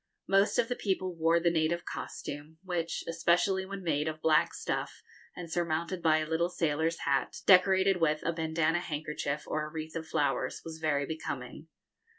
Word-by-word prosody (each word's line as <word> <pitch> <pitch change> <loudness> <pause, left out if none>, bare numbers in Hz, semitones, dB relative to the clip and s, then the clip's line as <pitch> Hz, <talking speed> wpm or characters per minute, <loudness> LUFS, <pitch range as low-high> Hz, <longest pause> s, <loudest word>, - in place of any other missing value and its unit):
Most 195 +1 +3
of 230 - +3
the 245 - -2
people 190 -4 -1
wore 165 +1 +3
the 170 0 +2
native 165 +1 0
costume, 145 +2 -6
which, 170 -3 -2
especially 175 +3 +2
when 195 -1 -6
made 150 -2 0
of 155 0 -3
black 155 -1 +3
stuff - - -3 0.3
and 175 -1 -7
surmounted 170 +1 -1
by 155 -1 +4
a 155 0 -1
little 165 +2 +1
sailor's 165 -1 0
hat, 140 -1 0
decorated 190 -1 +5
with 155 -1 +2
a 170 - +1
bandana 160 0 +1
handkerchief 150 -2 -3
or 155 - -2
a - - -11
wreath 160 -1 -6
of 160 -1 -4
flowers, 135 -5 0
was 160 -1 -7
very 145 -3 +1
becoming. 140 -2 -6
165 Hz, 170 wpm, -30 LUFS, 155-175 Hz, 0.3 s, decorated